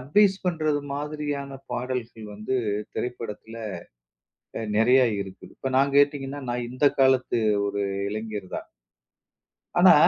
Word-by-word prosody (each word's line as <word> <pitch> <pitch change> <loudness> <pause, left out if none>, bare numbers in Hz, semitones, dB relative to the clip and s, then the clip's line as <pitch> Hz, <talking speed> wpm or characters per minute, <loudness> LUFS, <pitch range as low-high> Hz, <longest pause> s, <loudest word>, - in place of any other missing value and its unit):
Advice 190 +9 +4
பண்றது 155 -4 +1
மாதிரியான 145 -2 -3
பாடல்கள் 120 -3 -3
வந்து 105 +5 -2 0.4
திரைப்படத்துல 115 -2 -5 1.0
அ - - -3 0.2
நெறைய 125 +4 +6 0.2
இருக்குது. 95 -1 -12
இப்ப 135 - -2
நான் 140 +1 +3
கேட்டீங்கன்னா, 145 -1 +2
நான் 120 0 -2
இந்த 130 +3 -1 0.2
காலத்து 130 -2 +4 0.3
ஒரு 100 0 -1 0.3
இளைஞர்தான். 105 -3 -5 1.1
ஆனா, 180 0 +9
130 Hz, 105 wpm, -26 LUFS, 115-145 Hz, 1.1 s, ஆனா